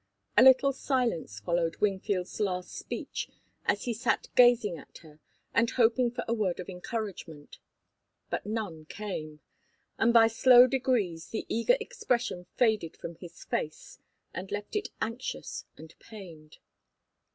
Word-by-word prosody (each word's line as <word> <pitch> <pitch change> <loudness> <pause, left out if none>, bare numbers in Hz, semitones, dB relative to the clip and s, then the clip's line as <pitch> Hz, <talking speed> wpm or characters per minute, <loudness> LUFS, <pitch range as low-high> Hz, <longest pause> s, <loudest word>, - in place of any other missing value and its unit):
A - - +7
little 265 +1 +7
silence 245 - -1
followed 165 +8 0
Wingfield's 195 -2 -1
last 180 -3 -2
speech, - - -5 0.4
as 205 - +1
he 240 - -1
sat 235 +2 -1
gazing 240 -6 +5
at - - -14
her 155 -1 -16 0.3
and 230 0 +3
hoping 240 +1 +3
for 245 +1 -5
a 230 - +1
word 205 -6 -1
of 180 - -6
encouragement. 180 -6 -6 0.7
But - - -3
none 205 -8 -4
came, 155 -6 -6 0.6
and 230 - +4
by 230 -1 +7
slow 245 +2 +7
degrees 240 -11 0
the 220 - -4
eager 230 - +2
expression 245 - -2
faded 220 -9 +1
from 170 - -7
his 170 -2 -12
face 155 - -4 0.3
and 185 +2 -6
left 205 - -5
it 415 0 -1
anxious 235 +3 -5
and 160 +1 -12
pained. 170 -8 -12
210 Hz, 140 wpm, -29 LUFS, 175-240 Hz, 0.7 s, A